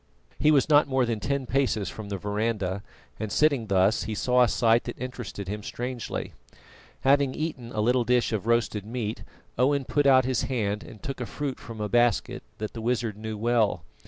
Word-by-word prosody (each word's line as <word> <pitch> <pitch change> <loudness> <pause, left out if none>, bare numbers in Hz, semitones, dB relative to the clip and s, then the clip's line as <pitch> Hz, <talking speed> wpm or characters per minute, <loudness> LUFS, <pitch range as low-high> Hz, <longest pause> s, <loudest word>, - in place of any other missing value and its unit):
He 150 - +4
was 145 -4 +4
not 150 -1 +5
more 130 -2 +2
than 115 -2 -2
ten 140 +3 -1
paces 125 -7 0
from 105 +3 -7
the 100 - -3
verandah, 105 -1 -2 0.4
and 110 -1 -3
sitting 140 -6 +2
thus 100 +2 +2
he 110 - -3
saw 125 +3 +2
a 125 - +6
sight 115 +1 +3
that - - -6
interested 125 -6 -6
him 105 +2 -4
strangely. 120 +3 -5 0.7
Having 140 -1 +3
eaten 145 -7 -4
a 110 - -1
little 125 +3 +3
of 115 - -4
a - - +3
dish 125 -1 +2
of 110 0 -2
roasted 115 -3 +1
meat, 110 0 -4 0.4
Owen 135 +1 +2
put 145 +2 +2
out 130 -2 +6
his 130 -2 +1
hand 105 -5 -1
and 110 - -13
took 135 -2 -5
a 120 - -3
fruit 145 -3 -4
from 115 -2 -9
a 105 - -1
basket 120 0 +2 0.2
that 110 0 -5
the 115 - -6
wizard 115 -2 -1
knew 110 0 -5
well. 115 -1 +1
120 Hz, 205 wpm, -26 LUFS, 105-130 Hz, 0.7 s, a